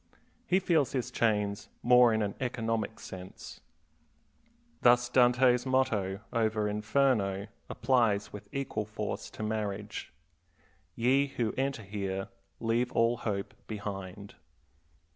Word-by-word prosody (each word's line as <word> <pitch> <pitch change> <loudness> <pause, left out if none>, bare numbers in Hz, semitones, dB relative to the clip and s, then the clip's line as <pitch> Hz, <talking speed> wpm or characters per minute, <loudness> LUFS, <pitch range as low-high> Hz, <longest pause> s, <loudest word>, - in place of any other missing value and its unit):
He 185 - +4
feels 165 -7 +2
his 130 -3 -2
chains 105 -2 0
more 125 0 +7
in 110 -1 +1
an 100 -1 -2
economic 115 -3 -2
sense. 95 0 -10 1.2
Thus 120 0 +5
Dante's 125 0 +4
motto 110 -7 0
over 110 -2 +1
Inferno 105 -2 +1 0.2
applies 115 -5 +1
with 105 0 -9
equal 135 -6 -2
force 105 +1 -4
to - - -7
marriage. 105 -2 -3 0.8
"Ye 135 +4 +3
who 120 -5 -2
enter 135 -4 -1
here 95 -1 -4 0.3
leave 120 +2 0
all 115 +1 +3
hope 100 -4 -3
behind." 100 -2 -6
110 Hz, 110 wpm, -30 LUFS, 100-125 Hz, 1.2 s, more